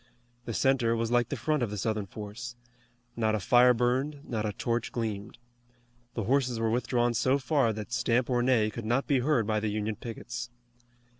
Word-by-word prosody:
The 115 - -4
center 125 -4 +2
was 115 0 -1
like 120 -1 +2
the - - -2
front 155 -2 0
of 120 - 0
the 105 - -5
Southern 105 0 -1
force. 110 +5 -7 0.6
Not 110 -2 +1
a - - -1
fire 125 +5 +5
burned, 130 +5 0
not 110 -3 -2
a - - -1
torch 120 +2 -2
gleamed. 110 -3 -4 0.8
The 115 - -1
horses 125 0 +1
were 115 -1 +1
withdrawn 120 0 +1
so 130 +4 +2
far 135 -3 +2
that 110 +2 -6
stamp 120 0 +1
or 125 -2 +1
neigh 120 -4 +3
could 115 - -6
not 120 +5 +1
be 140 -3 +2
heard 125 -3 +2
by 110 0 +1
the 110 0 -1
Union 105 +1 -2
pickets. 120 +1 -6
120 Hz, 195 wpm, -29 LUFS, 110-125 Hz, 0.8 s, fire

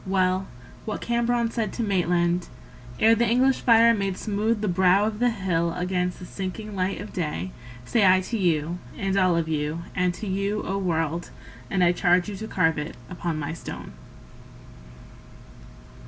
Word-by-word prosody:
Well, 185 0 +1 0.4
what 215 - -3
Cambronne 235 0 0
said 220 -4 -2
to 235 - -2
Maitland 175 -3 +1 0.5
Ere 225 +1 +6
the 230 +1 +2
English 255 +3 +3
fire 230 -1 +6
made 195 -3 -2
smooth 215 +1 -1
the 210 - 0
brow 185 +2 +4
of 215 0 -3
the 245 0 +3
hill 175 -6 -1
Against 180 0 -1
the 180 - -9
sinking 200 +3 -6
light 185 +1 -1
of 205 - -8
day 120 - -3 0.3
Say 225 - +2
I 185 -1 +6
to 230 - -4
you, 170 -3 0 0.2
and 195 -1 -1
all 185 -3 +3
of 165 -1 0
you, 155 +1 -2
And 180 0 +1
to 220 - -7
you, 200 +2 -1
O 195 - -2
world. 170 -2 -1 0.4
And 190 -2 +2
I 175 - +5
charge 175 0 +2
you 205 - -5
to 220 - -6
carve 160 -7 +1
it 150 +2 -6
Upon 170 -2 -3
my 155 +1 -3
stone. 165 - -8
185 Hz, 170 wpm, -25 LUFS, 175-215 Hz, 0.5 s, Ere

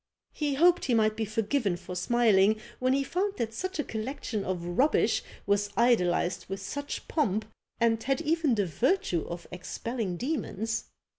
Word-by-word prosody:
He 295 -3 -1
hoped 345 +4 +4
he 245 - +2
might 215 -1 +3
be 220 - -1
forgiven 215 -2 0
for 180 - -8
smiling, 215 0 +3 0.2
when 255 +1 +2
he 275 0 +2
found 390 +7 -1
that 225 -1 -2
such 370 +10 -4
a 300 - 0
collection 225 -2 -4
of 185 -3 -3
rubbish 250 - +2 0.2
was 200 0 +1
idolized 180 -7 +2
with 195 0 -3
such 285 +8 -5
pomp, 215 - 0 0.3
and 225 -1 +3
had 270 +2 0
even 320 -4 +2
the 205 -2 +1
virtue 185 - 0
of 170 0 -6
expelling 190 +2 -4
demons. 225 - -2
225 Hz, 160 wpm, -29 LUFS, 195-275 Hz, 0.3 s, hoped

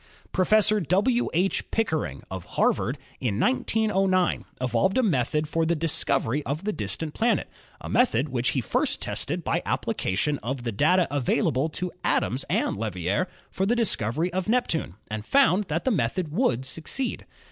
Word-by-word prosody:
Professor 215 +3 +4
W. 205 - +2
H. 185 +4 0
Pickering, 160 - -1
of 95 -2 -5
Harvard, 125 +6 +2 0.2
in 110 -5 -1
1909 190 - +1
evolved 125 - +1
a 260 - +4
method 150 - +1
for 165 +2 0
the 170 +1 +1
discovery 150 -4 0
of 145 +6 -3
the 210 +1 -1
distant 130 - -3
planet, 235 +1 +1 0.3
a - - -8
method 195 - +2
which 125 -1 0
he 130 - 0
first - - 0
tested - - -3
by - - 0
application 145 +10 -1
of 125 +2 -4
the 120 - -2
data 170 - +3
available 145 +1 +1
to 180 +3 -4
Adams 130 +3 +1
and - - 0
Leverrier 100 - -1 0.2
for 190 - -1
the 240 - +3
discovery 170 - 0
of 185 +2 -2
Neptune, 195 - +1 0.2
and 110 -1 -3
found 210 - +3
that 160 0 -2
the 260 - +3
method 160 - -1
would 150 - +1
succeed. 165 - -4
160 Hz, 160 wpm, -26 LUFS, 125-195 Hz, 0.3 s, Professor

